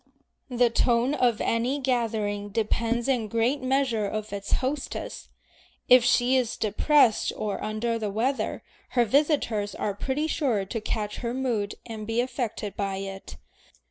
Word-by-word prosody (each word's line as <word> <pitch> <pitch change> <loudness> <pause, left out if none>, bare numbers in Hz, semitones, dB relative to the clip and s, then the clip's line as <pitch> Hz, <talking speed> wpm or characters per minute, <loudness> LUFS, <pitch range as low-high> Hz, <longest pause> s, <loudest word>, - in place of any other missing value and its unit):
The 245 -1 +3
tone 240 +3 +2
of 245 -6 +2
any 240 +5 +1
gathering 220 -6 -1
depends 230 +3 0
in 245 -5 +1
great 230 +6 +1
measure 255 -5 +1
on 215 0 -3
its 200 -1 -4
hostess. 270 +2 -3 0.6
If 250 -1 +8
she 245 +1 +3
is 250 -3 0
depressed 225 +3 +3
or 210 -2 -3
under 230 +2 -1
the 215 -2 -2
weather, 240 +7 -1 0.3
her 240 - +5
visitors 230 - +1
are 205 - -2
pretty 270 +9 -2
sure 250 -11 0
to 225 +3 -4
catch 210 -1 -3
her 240 0 -3
mood 235 -6 -1
and 220 -2 -7
be 225 +1 0
affected 240 -5 -3
by 195 -1 -2
it. 195 - -7
230 Hz, 145 wpm, -26 LUFS, 210-255 Hz, 0.6 s, If